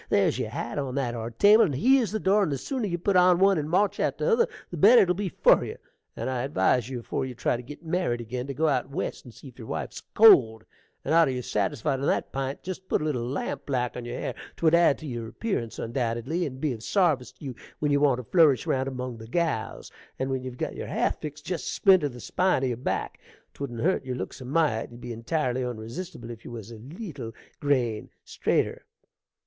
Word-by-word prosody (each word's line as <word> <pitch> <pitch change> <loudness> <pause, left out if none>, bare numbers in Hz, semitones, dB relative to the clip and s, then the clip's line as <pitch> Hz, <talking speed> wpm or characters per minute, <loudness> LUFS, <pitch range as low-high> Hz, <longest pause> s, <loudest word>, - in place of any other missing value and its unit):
There's - - +2
your - - -2
hat 120 +5 -4
on 135 -2 -3
that 130 -4 -1
are 115 -1 -4
table, 205 - +6
and 145 -8 -2
here's 250 - +4
the 215 - -1
door; 200 +1 +3
and 180 -7 +1
the 140 - -1
sooner 250 - -3
you 175 -2 -2
put 190 +3 0
on 180 -1 +6
one 195 -1 +4
and 150 0 -3
march 195 +4 +2
out - - 0
o' - - -1
t'other 470 0 +3 0.2
the 175 - -5
better 225 +10 +7
it - - -1
will - - +4
be 195 +1 -3
for - - +4
you. - - -6 0.4
And - - -4
I 130 -2 -1
advise 130 -2 +1
you, 125 -2 -4
afore 115 - -3
you 130 -1 -5
try 120 +1 0
to 120 - -5
git 150 +6 -11
married 165 -7 0
ag'in, 125 +3 -5
to 140 - -4
go 160 +4 +1
out 135 -3 0
West 140 - -4
and 125 - -11
see 135 - -12
'f 125 - -19
yer 110 - -9
wife's 80 -5 -5
cold; 115 - +7 0.4
and - - 0
arter 165 -3 +5
yer 125 -1 -3
satisfied 130 +7 -1
on 140 - -1
that - - 0
p'int, 135 0 -3
jest 185 +1 -7
put - - +2
a 150 - -3
little 145 -6 -1
lampblack 125 -1 -2
on 125 - -6
yer 120 +1 -5
hair, - - -3 0.2
'twould 160 -1 +3
add 170 -4 +5
to 155 - -10
yer 120 -5 -5
appearance, 120 - -3
undoubtedly, 120 +8 -2
and 130 -2 -8
be 145 -2 0
of 110 - -9
sarvice 155 - +1
tew - - -13
you 130 -3 -5 0.2
when 150 -1 0
you 145 - +3
want 140 -4 +3
to 125 - -6
flourish 145 -2 +4
round 130 0 0
among 125 -2 -5
the 110 0 -10
gals; 130 -6 -2 0.3
and 130 0 -2
when 130 -1 -1
ye've 130 -1 -7
got - - -3
yer - - -5
hair - - +1
fixt, 150 0 -8
jest 180 -3 -3
splinter 185 -7 +4
the 125 -1 -11
spine 180 +2 +1
o' - - +2
your 125 - -1
back, 125 - -3 0.3
'twouldn't 120 -5 -5
hurt 185 +3 +1
your 130 -1 -4
looks 110 +2 -6
a - - -7
mite: 135 -5 +1
you'd 120 - -12
be 120 -1 -6
intirely 125 +2 -1
unresistible 120 +3 -6
if 115 -1 -10
you - - -9
was 115 -2 -8
a 115 - -10
leetle 140 - -8 0.3
grain 125 -7 0 0.2
straiter. - - -1
135 Hz, 240 wpm, -26 LUFS, 120-170 Hz, 0.4 s, better